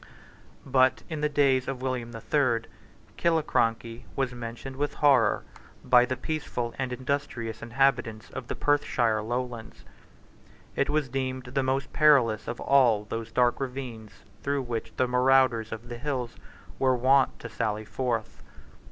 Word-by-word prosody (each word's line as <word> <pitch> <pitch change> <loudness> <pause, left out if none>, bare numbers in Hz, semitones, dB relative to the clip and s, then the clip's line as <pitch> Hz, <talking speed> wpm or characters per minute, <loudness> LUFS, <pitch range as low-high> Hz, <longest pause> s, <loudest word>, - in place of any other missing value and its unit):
But, 130 -1 +3
in 155 -2 -4
the 150 - +1
days 135 -3 +2
of 130 -2 -4
William 125 -3 -2
the 115 - -7
Third, 120 -4 +1 0.5
Killiecrankie 120 -8 0
was 135 -2 -1
mentioned 120 +2 -7
with 145 +2 -2
horror 135 -8 +4 0.4
by 125 -1 +6
the 130 0 -3
peaceful 125 -4 -3
and 130 -1 -2
industrious 125 -3 -3
inhabitants 120 -3 0
of 130 -2 -7
the - - -4
Perthshire 120 -7 +1
lowlands. 120 0 -5 0.9
It - - +1
was 150 -2 +1
deemed 130 0 -3
the 130 +2 -2
most 135 +1 -1
perilous 130 -8 +4
of 120 - -4
all 120 -7 +4
those 115 +1 -5
dark 120 -1 +2
ravines 125 -5 -6 0.2
through 140 -1 -1
which 120 -2 -4
the 130 - +2
marauders 125 -3 +3
of 115 +2 -7
the 120 -1 -7
hills 125 -3 -3 0.4
were 130 -1 +3
wont 130 +2 +3
to - - -7
sally 110 -1 -2
forth. 115 -2 -3
125 Hz, 145 wpm, -27 LUFS, 115-135 Hz, 0.9 s, by